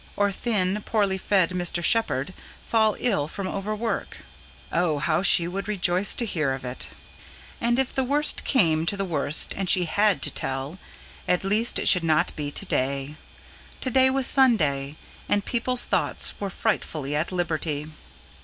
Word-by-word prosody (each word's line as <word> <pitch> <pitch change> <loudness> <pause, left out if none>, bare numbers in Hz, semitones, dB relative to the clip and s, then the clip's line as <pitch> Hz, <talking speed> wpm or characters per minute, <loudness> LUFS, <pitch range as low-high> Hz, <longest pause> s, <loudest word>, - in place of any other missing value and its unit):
Or 205 0 +1
thin, 205 -2 0
poorly 200 -4 0
fed 185 -3 +2
Mr. 175 -1 -2
Shepherd 185 - +1 0.3
fall 220 -2 +2
ill 195 -12 0
from 195 +4 -6
overwork. 215 +4 -3 0.5
Oh, 170 -3 +1
how 155 +3 0
she 175 -2 +3
would 195 +3 -5
rejoice 190 -1 0
to 240 - -1
hear 155 -10 -1
of 130 -1 -7
it! 125 +1 -4 0.7
And, 235 +1 +1
if 265 -1 0
the 265 - 0
worst 290 +4 +1
came 165 - +2
to 200 - 0
the 195 - -1
worst 150 -3 0
and 190 -2 -2
she 180 -2 +4
HAD 200 -2 +1
to - - +1
tell, 135 +7 -4 0.5
at 180 - +1
least 215 +4 +1
it - - +2
should 180 -3 +7
not 155 -2 +1
be 145 -1 -4
to - - -4
day. 135 +2 -1 0.7
To 260 - +1
day 260 +1 +5
was 265 0 0
Sunday; 155 - +2 0.3
and 205 0 +1
people's 245 +1 +1
thoughts - - +1
were 200 - -3
frightfully 155 -9 -2
at 155 +5 -1
liberty. 160 -4 -2
185 Hz, 165 wpm, -25 LUFS, 155-215 Hz, 0.7 s, should